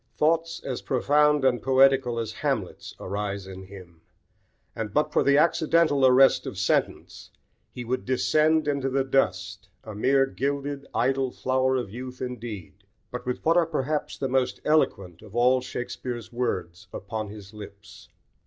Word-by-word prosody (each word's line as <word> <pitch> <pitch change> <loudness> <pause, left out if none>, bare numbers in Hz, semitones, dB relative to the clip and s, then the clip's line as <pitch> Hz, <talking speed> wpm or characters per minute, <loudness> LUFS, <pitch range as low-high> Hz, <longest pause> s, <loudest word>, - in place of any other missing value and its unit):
Thoughts 165 +2 +1
as 130 -2 -4
profound 145 +2 +2
and 125 -2 +2
poetical 135 -2 +3
as 115 -2 -3
Hamlet's - - -3
arise 100 0 -4
in 95 0 -9
him; 90 -4 -13 0.7
and 110 -2 -4
but 150 +5 0
for - - +3
the 140 0 +4
accidental 155 -3 +3
arrest 130 +1 +5
of - - -6
sentence 95 - -1 0.4
he 125 - -8
would 130 +2 -2
descend 155 +4 +2
into 140 -2 0
the 135 +1 +1
dust, 105 -6 -1
a 110 - -8
mere 135 +6 +3
gilded, 140 +1 -3
idle 130 +2 +1
flower 130 +1 0
of 120 -7 -3
youth 125 +2 -8
indeed, 115 -6 -7 0.3
but 125 0 -7
with 125 - -3
what 165 +2 +4
are 170 -2 +3
perhaps 150 -1 -2
the 135 - -2
most 130 -1 0
eloquent 100 - +1
of 105 - -14
all 125 +2 +3
Shakespeare's 125 -2 -6
words 90 -8 -3
upon 110 +2 -5
his 105 -1 -11
lips. 105 -1 -12
130 Hz, 155 wpm, -26 LUFS, 105-140 Hz, 0.7 s, arrest